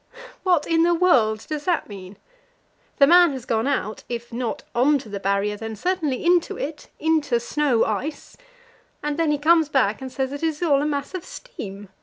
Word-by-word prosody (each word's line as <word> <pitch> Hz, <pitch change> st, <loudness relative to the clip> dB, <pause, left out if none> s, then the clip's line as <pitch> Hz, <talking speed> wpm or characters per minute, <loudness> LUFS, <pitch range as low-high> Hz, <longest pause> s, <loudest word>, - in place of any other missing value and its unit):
What 355 Hz, -5 st, +2 dB
in 330 Hz, -1 st, +2 dB
the 345 Hz, +1 st, +3 dB
world 235 Hz, -, +3 dB
does 305 Hz, -2 st, -4 dB
that 355 Hz, -2 st, 0 dB
mean? 195 Hz, -1 st, -10 dB, 0.8 s
The 280 Hz, -, +7 dB
man 345 Hz, 0 st, +6 dB
has 260 Hz, -2 st, -7 dB
gone 225 Hz, +1 st, 0 dB
out 240 Hz, -6 st, -2 dB
if 235 Hz, 0 st, -6 dB
not 235 Hz, -1 st, -3 dB
out -, -, -2 dB
on 295 Hz, -1 st, +5 dB
to 245 Hz, -5 st, -10 dB
the 200 Hz, -1 st, -5 dB
Barrier, 200 Hz, +1 st, 0 dB
then 225 Hz, +1 st, -6 dB
certainly 315 Hz, -, -2 dB
into 350 Hz, -1 st, +2 dB
it 295 Hz, +2 st, -6 dB
into 300 Hz, -6 st, +1 dB
snow 255 Hz, -1 st, +1 dB
ice, 265 Hz, +9 st, -4 dB, 0.7 s
and 295 Hz, 0 st, -1 dB
then 325 Hz, 0 st, +1 dB
he 295 Hz, -, +2 dB
comes 320 Hz, +1 st, +3 dB
back 255 Hz, -5 st, +1 dB
and 260 Hz, -1 st, -6 dB
says 265 Hz, +1 st, -2 dB
that 285 Hz, -, -6 dB
it 325 Hz, -, +1 dB
is 315 Hz, +1 st, -3 dB
all 285 Hz, -5 st, +3 dB
a 295 Hz, -, 0 dB
mass 285 Hz, +1 st, -3 dB
of 370 Hz, -3 st, -5 dB
steam. 205 Hz, -, -9 dB
280 Hz, 205 wpm, -23 LUFS, 225-320 Hz, 0.8 s, The